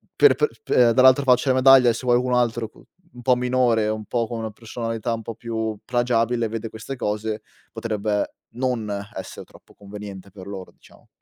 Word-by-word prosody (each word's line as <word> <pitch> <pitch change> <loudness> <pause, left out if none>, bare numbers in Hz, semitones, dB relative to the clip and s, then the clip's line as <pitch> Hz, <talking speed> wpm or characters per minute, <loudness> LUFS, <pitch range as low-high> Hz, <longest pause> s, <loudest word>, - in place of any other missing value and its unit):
per 430 - +6
pe 450 - +2
p 440 - -24
ehm, - - +3
per 115 - +4
dall'altra 130 +1 +6
faccia 125 +1 +3
della 130 0 +2
medaglia, 130 -2 +7
eh, - - +3
se 125 +2 -7
vuoi 120 0 +5
cu 125 - -2
un 125 - 0
altro 120 -2 0
cu - - -20 0.3
un 125 - -11
po' 125 +1 +3
minore, 125 -3 +1
un 110 0 -3
po' 120 -1 -1
con 115 -2 -5
una 110 -1 -4
personalità 115 +1 -4
un 115 - -4
po' 115 +1 -7
più 110 -2 -4
plagiabile, 120 -1 +1
vede 115 +1 -5
queste 110 +5 -7
cose 105 -1 -3 0.3
potrebbe 110 -2 -2 0.2
non 125 -4 -2 0.2
essere 95 - -8
troppo - - -20
conveniente 100 -1 -10
per 95 -2 -11
loro 95 -2 -8
diciamo. - - -22
115 Hz, 210 wpm, -23 LUFS, 110-125 Hz, 0.3 s, medaglia